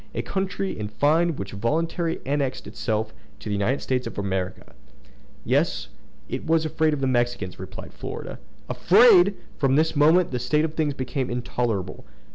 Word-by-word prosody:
—a -, -, -1 dB
country, 195 Hz, 0 st, -2 dB
in 105 Hz, -1 st, -4 dB
fine, 155 Hz, +9 st, +2 dB
which 100 Hz, -5 st, -6 dB
voluntarily 165 Hz, -, -1 dB
annexed 135 Hz, -1 st, -1 dB
itself 110 Hz, -1 st, -2 dB, 0.3 s
to 105 Hz, -, -7 dB
the -, -, -1 dB
United 100 Hz, +7 st, 0 dB
States 125 Hz, -1 st, -1 dB
of -, -, -8 dB
America!" 95 Hz, -2 st, -3 dB, 0.7 s
"Yes; -, -, +1 dB, 0.4 s
because -, -, -4 dB
it -, -, -10 dB
was 160 Hz, 0 st, +3 dB
afraid 155 Hz, 0 st, +1 dB
of 140 Hz, -, -6 dB
the -, -, +1 dB
Mexicans!" 120 Hz, -7 st, -1 dB
replied 95 Hz, -, -9 dB
Florida. -, -, -7 dB, 0.3 s
"Afraid!" 200 Hz, -1 st, +6 dB, 0.2 s
From 135 Hz, -2 st, +3 dB
this 160 Hz, +2 st, +2 dB
moment 160 Hz, +4 st, +4 dB
the 125 Hz, -, -2 dB
state 150 Hz, +6 st, +1 dB
of 155 Hz, -, -4 dB
things 155 Hz, -3 st, 0 dB
became 130 Hz, -1 st, -3 dB
intolerable. 120 Hz, -6 st, -2 dB
135 Hz, 165 wpm, -24 LUFS, 110-160 Hz, 0.7 s, Afraid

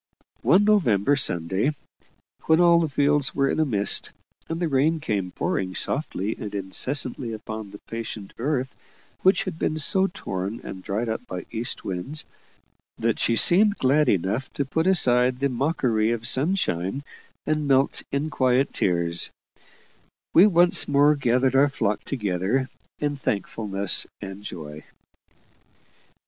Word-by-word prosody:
One 190 Hz, +4 st, +4 dB
November 145 Hz, -, +3 dB
Sunday, 95 Hz, -, 0 dB, 0.7 s
when 160 Hz, +1 st, +4 dB
all 170 Hz, -1 st, +5 dB
the 165 Hz, -2 st, 0 dB
fields 145 Hz, 0 st, +2 dB
were 140 Hz, 0 st, +1 dB
in -, -, -2 dB
a 155 Hz, -, +3 dB
mist, 105 Hz, -7 st, 0 dB, 0.4 s
and 165 Hz, 0 st, -3 dB
the 175 Hz, -, 0 dB
rain 155 Hz, +3 st, +1 dB
came 100 Hz, -9 st, -2 dB
pouring 95 Hz, +1 st, -3 dB
softly 110 Hz, -, -1 dB
and 105 Hz, -1 st, -6 dB
incessantly 120 Hz, +5 st, -1 dB
upon 110 Hz, -1 st, -7 dB
the 100 Hz, -, -11 dB
patient 115 Hz, -3 st, -6 dB
earth 130 Hz, 0 st, -2 dB, 0.5 s
which 190 Hz, +1 st, +3 dB
had 180 Hz, -4 st, -6 dB
been 155 Hz, -, -1 dB
so 190 Hz, +5 st, +4 dB
torn 100 Hz, -, -5 dB
and 95 Hz, -1 st, -8 dB
dried 105 Hz, +5 st, -3 dB
up 115 Hz, +2 st, -4 dB
by 90 Hz, -2 st, -6 dB
east 115 Hz, +1 st, -3 dB
winds, 95 Hz, +12 st, -4 dB, 0.7 s
that 115 Hz, -1 st, -1 dB
she 115 Hz, -, +2 dB
seemed 200 Hz, -, +5 dB
glad 145 Hz, +4 st, +2 dB
enough 100 Hz, +7 st, -1 dB
to 140 Hz, -, -2 dB
put 160 Hz, +6 st, -1 dB
aside 125 Hz, -8 st, +3 dB
the 140 Hz, +2 st, 0 dB
mockery 125 Hz, -5 st, 0 dB
of 115 Hz, 0 st, -2 dB
sunshine 135 Hz, -, 0 dB, 0.4 s
and 155 Hz, -1 st, -1 dB
melt 135 Hz, 0 st, +2 dB
in 145 Hz, +3 st, -2 dB
quiet 130 Hz, +1 st, +1 dB
tears, 85 Hz, -2 st, 0 dB, 1.0 s
we 185 Hz, +5 st, +7 dB
once 175 Hz, -2 st, +4 dB
more 145 Hz, +1 st, +4 dB
gathered 130 Hz, -2 st, +1 dB
our 140 Hz, +2 st, +5 dB
flock 105 Hz, -6 st, -2 dB
together 105 Hz, +2 st, -1 dB, 0.3 s
in 145 Hz, -1 st, -2 dB
thankfulness 100 Hz, -5 st, -1 dB
and 95 Hz, 0 st, -8 dB
joy. 75 Hz, -5 st, -8 dB
130 Hz, 140 wpm, -24 LUFS, 100-150 Hz, 1.0 s, we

